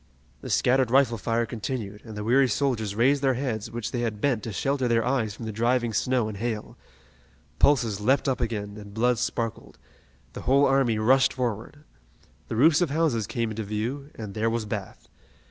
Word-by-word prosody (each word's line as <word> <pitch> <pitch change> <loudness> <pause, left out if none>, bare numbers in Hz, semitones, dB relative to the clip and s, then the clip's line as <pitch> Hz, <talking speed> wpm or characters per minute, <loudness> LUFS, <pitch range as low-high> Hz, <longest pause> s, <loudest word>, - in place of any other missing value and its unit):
The - - -7
scattered 130 -1 +2
rifle 125 -3 +3
fire 115 +3 0
continued, 110 -3 -5
and 110 -3 -9
the 105 - -4
weary 130 +5 +4
soldiers 110 -4 -1
raised 135 +5 +3
their 135 -2 +2
heads 120 -4 -3
which 115 -1 -5
they 120 - -2
had 110 -3 -2
bent 125 -3 +1
to 115 - -5
shelter 135 +6 0
their 115 -1 +2
eyes 120 -5 0
from 115 - -8
the 110 - -3
driving 120 +1 0
snow 125 0 +1
and 105 -2 -6
hail. 110 0 -4 0.8
Pulses 115 -8 +3
leaped 130 +7 +2
up 130 - 0
again, 105 -3 -3
and 105 -1 -11
blood 120 +1 +2
sparkled. 115 -3 -3 0.6
The - - -7
whole 140 +3 +4
army 135 -5 +2
rushed 130 +5 +4
forward. 125 +3 -4 0.6
The - - -4
roofs 150 +7 +5
of 175 - +2
houses 140 -8 0
came 115 -3 -2
into 110 +1 -4
view, 115 +8 -4
and 105 -3 -7
there 110 +2 0
was 115 -1 -2
Bath. 105 -2 -6
115 Hz, 190 wpm, -26 LUFS, 110-130 Hz, 0.8 s, roofs